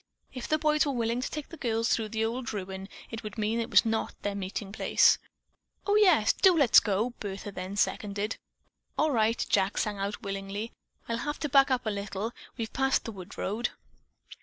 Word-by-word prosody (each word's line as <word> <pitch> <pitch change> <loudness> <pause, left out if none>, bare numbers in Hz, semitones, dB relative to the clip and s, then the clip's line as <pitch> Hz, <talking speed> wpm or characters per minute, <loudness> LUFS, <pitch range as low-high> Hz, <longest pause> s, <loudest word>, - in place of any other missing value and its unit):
If 255 -2 -5
the 310 - +2
boys 305 0 +3
were 285 - -1
willing 235 0 0
to - - -3
take 300 -2 -6
the 330 - -10
girls 230 -3 0
through 220 -2 +1
the 220 +1 0
old 240 +2 -3
ruin, 190 -1 -5 0.2
it 225 -1 -5
would 215 0 -8
mean 220 +2 0
that 230 - 0
it - - -14
was - - +6
not 225 0 -1
their 205 - -1
meeting 195 0 -4
place. 215 - +4 0.7
"Oh, 410 - +2
yes—do 370 - +5
let's 275 -7 +7
go!" 215 +4 0
Bertha 200 0 -5
then 185 +1 -6
seconded. 205 +1 -1 0.6
"All 310 0 +3
right," 225 -2 +2
Jack 195 0 +1
sang 210 -2 -1
out 200 +4 -3
willingly. 195 +2 -4 0.4
"I'll 230 - -1
have 295 +5 -3
to 295 - -1
back 275 0 +6
up 255 -2 0
a 215 - 0
little. 200 +2 -3 0.3
We've 225 -2 -4
passed 270 0 +1
the 230 - -4
wood 185 -4 -10
road." 225 +5 -1
225 Hz, 200 wpm, -29 LUFS, 200-255 Hz, 0.7 s, let's